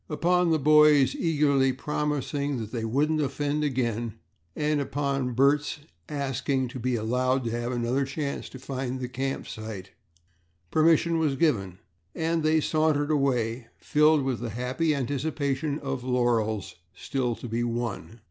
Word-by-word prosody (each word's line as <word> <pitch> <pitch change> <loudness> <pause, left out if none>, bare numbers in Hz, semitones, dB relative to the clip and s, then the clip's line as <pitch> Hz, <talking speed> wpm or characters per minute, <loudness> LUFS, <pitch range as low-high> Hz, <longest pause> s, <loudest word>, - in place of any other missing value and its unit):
Upon 175 +3 +2
the 160 - +3
boys 150 -1 +5
eagerly 145 -5 +2
promising 145 0 -2
that 110 -2 -5
they 115 -3 -3
wouldn't 150 +7 +1
offend 145 +2 -1
again 120 -5 -1 0.4
and 150 -1 +1
upon 140 -2 -1
Bert's 140 +4 +2 0.3
asking 135 -2 -1
to 130 - -7
be 125 +1 0
allowed 125 +4 0
to 115 - -2
have 120 +1 -2
another 125 +3 0
chance 140 +1 -4
to - - -10
find 130 -1 -4
the 125 - -3
camp 135 +2 -3
site, 110 -4 -7 0.8
permission 165 +1 +3
was 150 -4 +1
given 100 - 0 0.4
and 165 0 0
they 155 0 +3
sauntered 155 -1 +1
away, 125 -5 0
filled 150 -1 +3
with 130 -4 -1
the 120 0 -4
happy 130 +7 -1
anticipation 140 +1 -1
of 135 -4 -4
laurels 110 -7 0 0.2
still 125 -4 -2
to 125 - -8
be 115 +1 -1
won. 120 -1 -4
135 Hz, 145 wpm, -27 LUFS, 120-150 Hz, 0.8 s, boys